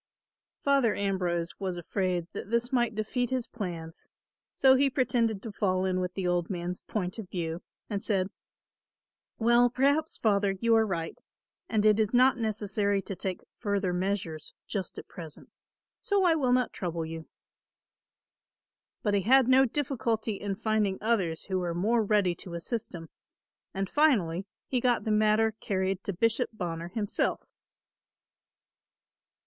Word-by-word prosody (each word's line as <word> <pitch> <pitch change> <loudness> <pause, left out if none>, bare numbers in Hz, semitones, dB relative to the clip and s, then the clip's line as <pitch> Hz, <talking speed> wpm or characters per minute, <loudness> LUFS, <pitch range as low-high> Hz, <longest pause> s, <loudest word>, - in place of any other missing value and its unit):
Father 275 -5 +3
Ambrose 180 -4 -1
was 185 -2 -3
afraid 180 0 -1
that - - -6
this 235 +2 0
might 240 -3 +2
defeat 240 +3 -1
his 255 -2 -1
plans; 170 -7 -6 0.5
so 265 -1 +6
he 275 +1 +4
pretended 235 -5 0
to 225 - -5
fall 185 -2 0
in 185 -1 0
with 180 0 -3
the 190 - -2
old 175 -1 0
man's 180 -1 -4
point 185 0 -3
of 200 -5 -7
view 170 -2 -3 0.3
and 205 -2 -3
said, 195 -4 0 1.1
"Well, 240 +1 +4
perhaps, 285 +5 +1
Father, 200 -2 +2
you 230 +2 +3
are 220 -1 +4
right 165 -4 -3 0.5
and 215 -1 +1
it 215 0 +5
is 220 +2 +1
not 255 0 +5
necessary 205 -2 0
to 195 - -5
take 185 0 -4 0.2
further 200 -3 0
measures 180 -4 -3
just 195 -4 -4
at - - -8
present, 160 -4 -10 0.5
so 400 -1 +2
I 350 -2 +5
will 270 -6 +1
not 250 0 +2
trouble 170 -3 -3
you." 160 0 -7 1.8
But 205 - +1
he 200 - +3
had 260 +5 +5
no 260 +1 +6
difficulty 235 -5 -1
in 200 0 -3
finding 215 -2 0
others 195 -8 0
who 190 -2 -1
were 175 -2 -2
more 220 +6 +2
ready 205 -4 +2
to 175 -2 -7
assist 205 +4 -4
him, 165 -2 -9 0.6
and 195 0 -2
finally 195 - +2 0.2
he 255 - 0
got 245 -1 +2
the 220 - -1
matter 215 +1 +3
carried 190 -1 -1
to - - -1
Bishop 225 +5 +1
Bonner 170 -5 -4
himself. 205 +3 -1
205 Hz, 155 wpm, -29 LUFS, 180-235 Hz, 1.8 s, so